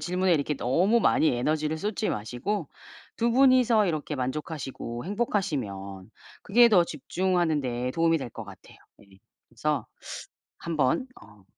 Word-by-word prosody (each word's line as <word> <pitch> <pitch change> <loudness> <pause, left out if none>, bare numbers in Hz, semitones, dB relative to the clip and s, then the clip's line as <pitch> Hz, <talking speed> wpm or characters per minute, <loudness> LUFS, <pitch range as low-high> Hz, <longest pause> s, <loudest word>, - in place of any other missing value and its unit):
질문에 180 +3 +1
이렇게 150 -2 0
너무 180 - +2
많이 160 - +3
에너지를 155 +4 0
쏟지 210 +3 -2
마시고 125 - -3 0.5
2 235 +1 +1
분이서 250 -4 +5
이렇게 155 -3 -2
만족하시고 130 -3 -5
행복하시면 130 - -3 0.3
그게 235 +4 +5
더 185 -5 +6
집중하는 170 +1 0
데 125 -1 -2
도움이 165 +1 +2
될 130 -4 -6
것 115 - -8
같아요. 100 -2 -14 0.2
예. - - -18 0.4
그래서 140 +4 -2 0.7
1 170 -1 -4
번 145 - +1 0.2
어 105 -3 -18
155 Hz, 295 characters per minute, -27 LUFS, 125-195 Hz, 0.7 s, 더